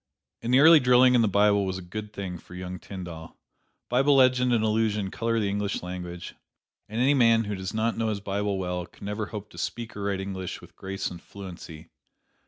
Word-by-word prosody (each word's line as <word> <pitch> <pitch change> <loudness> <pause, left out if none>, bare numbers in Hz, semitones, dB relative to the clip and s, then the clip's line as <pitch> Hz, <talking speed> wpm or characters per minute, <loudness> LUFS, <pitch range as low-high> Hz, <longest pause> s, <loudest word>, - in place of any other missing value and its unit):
And 115 - -2
the 130 +2 +6
early 160 +1 +9
drilling 125 0 +5
in 120 - +5
the 115 - +3
Bible 100 0 +3
was 95 -1 -2
a - - -7
good 105 +4 -7
thing 95 -4 -6
for 90 - -13
young 90 0 -6
Tyndall. 85 -5 -9 0.5
Bible 135 +3 +3
legend 130 -1 +4
and 115 -2 +2
allusion 105 -3 0
color 115 0 0
the 105 - 0
English 100 -1 -2
language, 90 -1 -6 0.6
and 110 +2 -3
any 135 +3 +4
man 115 -4 +4
who 105 -1 -4
does 95 -1 -4
not 115 +1 -1
know 115 - +1
his 105 -2 -2
Bible 100 0 -2
well, 90 -1 -3
can - - -13
never 105 +1 -3
hope 105 -1 -8
to - - -10
speak 115 -1 -4
or 100 - -6
write 100 -1 -1
English 95 -1 -5
with - - -16
grace 95 0 -4
and 85 -1 -9
fluency. 90 -5 -10
105 Hz, 210 wpm, -26 LUFS, 95-115 Hz, 0.6 s, early